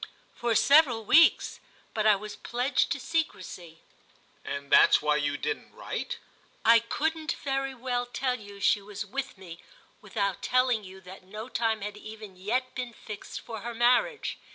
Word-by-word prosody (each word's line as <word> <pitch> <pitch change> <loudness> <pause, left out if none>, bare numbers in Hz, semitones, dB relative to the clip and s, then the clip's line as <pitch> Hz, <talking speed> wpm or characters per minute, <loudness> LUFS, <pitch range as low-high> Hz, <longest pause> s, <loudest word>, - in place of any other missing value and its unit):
"For 235 -1 -1
several 270 -4 +5
weeks, 325 +8 +5 0.3
but 215 -1 +1
I 210 - +7
was 210 +1 -7
pledged 245 +3 0
to - - -1
secrecy." 185 - -4 0.6
"And 140 0 -6
that's - - +7
why 150 0 +2
you 145 -1 -1
didn't 440 - -4
write?" - - -4 0.5
"I 230 +1 +8
couldn't 315 +7 -2
very 270 -1 -1
well 245 0 -2
tell 250 0 -1
you 205 -1 -11
she 200 +1 +3
was 205 +1 -6
with 270 +3 -5
me 175 -3 -10 0.4
without 200 -3 -2
telling 250 0 +2
you 190 0 -11
that 185 +1 -11
no 215 +5 -8
time 225 -3 0
had 210 +1 -5
even 215 -2 -10
yet 235 +8 -2
been 250 -2 -5
fixed 210 -1 -8
for 225 -2 -7
her 235 +3 -6
marriage. 250 - +2
225 Hz, 160 wpm, -28 LUFS, 200-255 Hz, 0.6 s, I